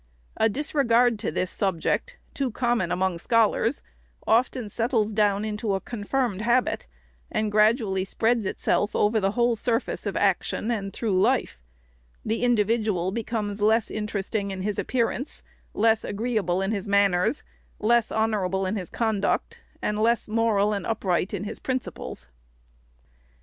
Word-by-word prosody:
A 220 - +3
disregard 245 -3 +2
to 205 - -2
this 185 - -2
subject, 195 - -1 0.2
too 275 -2 -1
common 235 -6 0
among 185 -2 0
scholars, 230 +4 +2 0.4
often 240 0 +2
settles 220 0 0
down 205 -1 +2
into 210 -1 -1
a - - -1
confirmed 230 -1 -2
habit, 240 - +1 0.4
and 215 -1 0
gradually 210 -2 +3
spreads 225 +2 0
itself 205 - 0
over 215 +2 +3
the 195 -1 0
whole 240 0 +2
surface 230 +2 -1
of - - -2
action, 230 - 0
and 200 -4 -2
through 195 -3 0
life; - - +1 0.7
the 220 +1 -1
individual 215 -5 +1
becomes 215 -2 -3
less 220 +1 +3
interesting 210 -1 -2
in 190 -1 -5
his 205 0 -2
appearance, 255 +2 -2 0.3
less 220 +1 +3
agreeable 205 -4 -1
in 195 - -1
his 205 -2 -3
manners, 200 +4 +2 0.3
less 235 +1 +2
honor 220 -2 +1
able 190 +1 -1
in 195 +3 -1
his 185 -3 -5
conduct, 220 -4 -1 0.2
and 210 0 -1
less 230 +2 +2
moral 215 -2 +2
and 200 - -3
upright 190 -4 0
in 200 -2 -3
his 210 +2 -6
principles. 255 - -4
215 Hz, 145 wpm, -25 LUFS, 200-230 Hz, 0.7 s, A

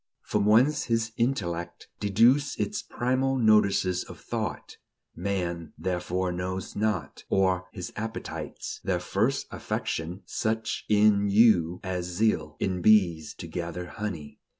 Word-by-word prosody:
"... - - -57
From 105 -1 +2
whence 130 +8 +4
his 115 -1 0
intellect 85 -9 -2
Deduced 115 +8 +3
its 210 - -1
primal 130 +2 0
notices 100 -5 +3
of - - -12
thought, - - -4 0.4
Man 85 -3 -3
therefore 90 0 -1
knows 90 +1 -4
not; 105 -8 -2
or 95 -1 +2
his 90 -1 -7
appetites 110 +1 -5
Their - - 0
first - - 0
affection; 85 +4 -3
such 110 0 -2
In 105 -1 +4
you 95 -5 +4
as 90 -2 -3
zeal 85 -6 0
In 90 -2 -1
bees 90 -6 +3
to - - -8
gather 85 +1 -4
honey." 85 -6 -6
95 Hz, 125 wpm, -27 LUFS, 90-110 Hz, 0.4 s, whence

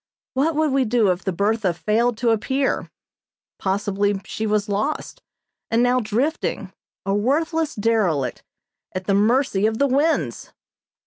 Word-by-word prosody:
What 295 +5 +1
would 310 -1 +2
we 270 0 +3
do 220 -4 +2
if 180 +1 -3
the 190 - -1
Bertha 200 0 0
failed 225 +5 +1
to 235 0 +2
appear? 265 +5 0 0.7
Possibly 200 +1 0
she 220 - -3
was 210 0 +1
lost, 210 +9 -2 0.5
and 230 +2 +3
now 250 +1 +3
drifting, 250 +8 -2 0.3
a 195 - 0
worthless 310 +8 0
derelict, 200 - 0 0.5
at 185 0 -3
the 200 - +1
mercy 215 0 +3
of 220 0 -1
the 280 - +3
winds! 290 +5 0
220 Hz, 140 wpm, -22 LUFS, 200-265 Hz, 0.7 s, we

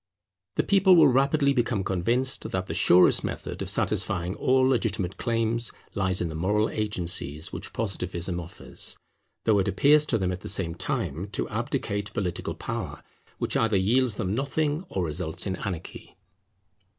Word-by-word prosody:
The - - +2
people 195 -2 +5
will 165 - +7
rapidly 140 +2 +3
become 120 -5 0
convinced 115 +9 +1
that 95 0 -2
the - - -5
surest 90 +1 +5
method - - -5
of - - -2
satisfying 90 -1 0
all 130 +4 +2
legitimate 110 -7 0
claims 115 0 0 0.2
lies 95 -2 0
in 85 - 0
the 80 - -6
moral 105 +7 +1
agencies 90 -7 -2
which - - -6
Positivism 90 -4 -3
offers, 85 0 -5 0.5
though 105 -2 +3
it 95 - 0
appears 145 - +4
to 115 - +1
them 95 -3 -1
at 90 - -4
the - - -5
same 90 -4 +1
time 85 +1 -3
to - - -1
abdicate 100 0 -3
political 90 -4 -3
power - - -5 0.3
which - - -2
either 110 -3 +2
yields 115 +4 +2
them 100 -3 -2
nothing 145 +5 -1
or 95 - -2
results 80 +1 -3
in 95 -2 -2
anarchy. 90 -1 -7
100 Hz, 160 wpm, -26 LUFS, 90-125 Hz, 0.5 s, will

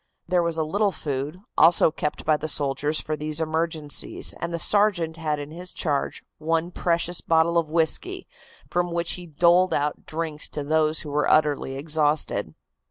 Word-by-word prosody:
There 180 0 +2
was 170 -1 -1
a 160 - +1
little 200 +6 +1
food, 145 +2 -4 0.2
also 165 -1 +6
kept 150 0 -4
by 155 - +4
the 150 +1 -4
soldiers 145 +1 +1
for 155 - -3
these 150 +1 -3
emergencies, 160 -2 0
and 170 - -3
the 170 - -2
sergeant 175 -3 +2
had 155 -2 -1
in 145 +1 -7
his 180 +3 -5
charge 145 -4 -2 0.2
one 165 +2 -1
precious 175 0 0
bottle 165 +1 +2
of 165 -2 +1
whisky, 170 - 0 0.4
from 175 0 -1
which 170 0 0
he 180 -1 -5
doled 170 +3 +3
out 145 +1 -2
drinks 155 -1 -4
to 145 - -3
those 155 +1 +1
who 150 - -8
were 150 +1 +1
utterly 145 -3 +2
exhausted. 150 +1 0
160 Hz, 170 wpm, -24 LUFS, 150-170 Hz, 0.4 s, also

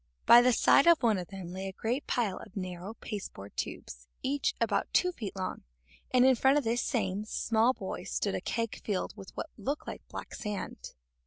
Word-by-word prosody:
By 240 - +9
the 250 +1 +4
side 275 +5 +5
of 335 -5 +6
one 220 -5 +3
of 175 - -6
them 190 -3 -8
lay 190 +1 -4
a - - -4
great 240 +8 -2
pile 225 -7 0
of 210 -2 -11
narrow 185 +2 -5
pasteboard 195 - -7
tubes, - - -6 0.2
each 280 +2 0
about - - 0
two 360 - +4
feet 220 - -6
long, 185 -1 -4 0.5
and 250 0 +5
in 265 - +7
front 265 +3 +4
of 295 - +1
this 235 +1 +1
same 205 -5 -1
small 225 +3 +2
boy - - -6
stood - - -1
a - - -2
keg 230 -1 -3
filled 200 -4 -2
with 190 - -10
what - - -4
looked 280 +9 -3
like - - -6
black - - -8
sand. 210 -2 -5
220 Hz, 200 wpm, -30 LUFS, 190-250 Hz, 0.5 s, By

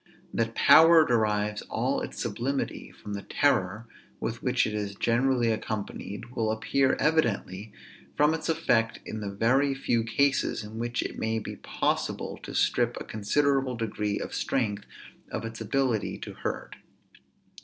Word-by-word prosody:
That 115 0 -1
power 165 0 +7
derives 105 -3 +1
all - - 0
its - - -6
sublimity 135 +3 -3
from 105 - -9
the 100 - -4
terror 110 -5 +1 0.3
with 115 +1 -3
which 125 -1 +2
it 110 - -3
is 100 -2 -3
generally 120 +1 +2
accompanied, 110 0 -5
will 115 -3 0
appear 130 +5 +1
evidently 110 - 0 0.5
from 150 +1 +4
its 160 +1 -3
effect 120 -9 +2
in 110 - -5
the 100 - -3
very 130 +7 +2
few 120 -4 0
cases, 130 +1 +1
in 110 +2 -8
which 120 0 -1
it - - -6
may 110 0 0
be 110 - -6
possible - - -2
to - - -8
strip - - +2
a - - -5
considerable 135 +4 +1
degree 105 -2 -2
of - - -5
strength 105 -6 -1 0.5
of - - -3
its 115 0 -7
ability 115 -1 0
to - - -8
hurt. - - -5
115 Hz, 150 wpm, -28 LUFS, 105-135 Hz, 0.5 s, power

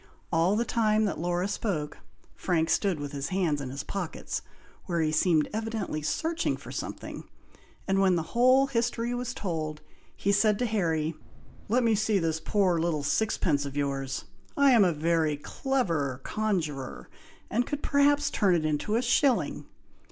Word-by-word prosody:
All 170 +5 +3
the 235 +2 +1
time 215 -2 +2
that 200 - -2
Laura 175 +2 0
spoke, 180 -8 -3 0.4
Frank 165 -3 0
stood, 195 -6 +1
with 145 -1 -5
his 140 -1 -3
hands 175 -6 0
in 135 - -5
his 140 +2 -5
pockets, 185 -5 -4 0.4
where 170 -3 -1
he 155 -1 +1
seemed 155 -1 +3
evidently 220 -7 -3
searching 325 - -1
for - - -11
something, - - -6 0.6
and 195 0 +2
when 190 -2 +4
the 165 - 0
whole 255 +3 +5
history 240 -2 -1
was 250 +1 -3
told, 155 -5 -3 0.4
he 200 - +1
said 210 0 +3
to 245 - 0
Harry, 165 -8 0 0.6
"Let 245 +3 +3
me 230 -1 +3
see 215 0 +2
this 165 -3 0
poor 185 -1 +1
little 160 -3 0
sixpence 150 -4 +1
of 140 0 -6
yours! 135 -1 -2 0.3
I 280 -1 +6
am 230 -5 +6
a 180 - +3
very 160 -1 +1
clever 165 - -1
conjuror, 165 -11 -2 0.4
and 240 +3 +1
could 290 0 -4
perhaps 285 0 +3
turn 195 -4 +3
it 160 -2 0
into 155 +8 0
a 235 - +1
shilling!" 255 +2 +1
185 Hz, 165 wpm, -28 LUFS, 155-225 Hz, 0.6 s, I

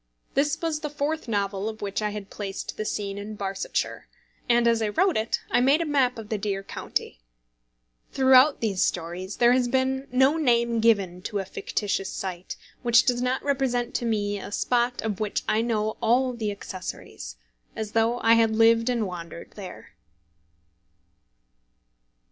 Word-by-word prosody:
This 295 +3 +1
was 325 -2 -1
the 300 -1 -4
fourth 295 0 -2
novel 200 -1 -1
of 220 -1 -8
which 200 +1 -2
I 210 - 0
had 205 -1 -7
placed 200 -2 -5
the 215 - -4
scene 200 -1 -3
in 210 +1 -7
Barsetshire, 195 -1 -3 0.4
and 240 0 +4
as 230 -1 +3
I 215 - +1
wrote 370 - +2
it 220 +1 0
I - - +4
made 275 +5 +4
a 335 - 0
map 270 -5 +2
of 220 -2 -8
the 215 - -1
dear 195 -1 -2
county. - - -4 0.9
Throughout 265 +2 +5
these 200 -5 0
stories 175 +3 -3
there 240 0 +5
has 250 -1 +2
been 265 +1 0
no 265 +5 +4
name 235 -5 +2
given 200 -6 +2
to 205 - -4
a 195 - -2
fictitious 195 0 -2
site 185 -2 -5 0.2
which 235 -2 +5
does 245 -1 +1
not 255 +1 0
represent 260 -4 0
to 240 - -1
me 205 -3 -1
a - - -8
spot 245 +3 0
of 210 -3 -2
which 210 -2 -2
I 220 - +2
know 220 -2 -1
all 250 +2 +2
the 225 -3 -3
accessories, 190 - -7 0.4
as 215 -1 -4
though 230 +2 +2
I 225 - +5
had 225 -1 +3
lived 230 +1 +4
and 235 -3 0
wandered 170 -2 -8
there. 190 -4 -10
225 Hz, 170 wpm, -26 LUFS, 205-250 Hz, 0.9 s, Throughout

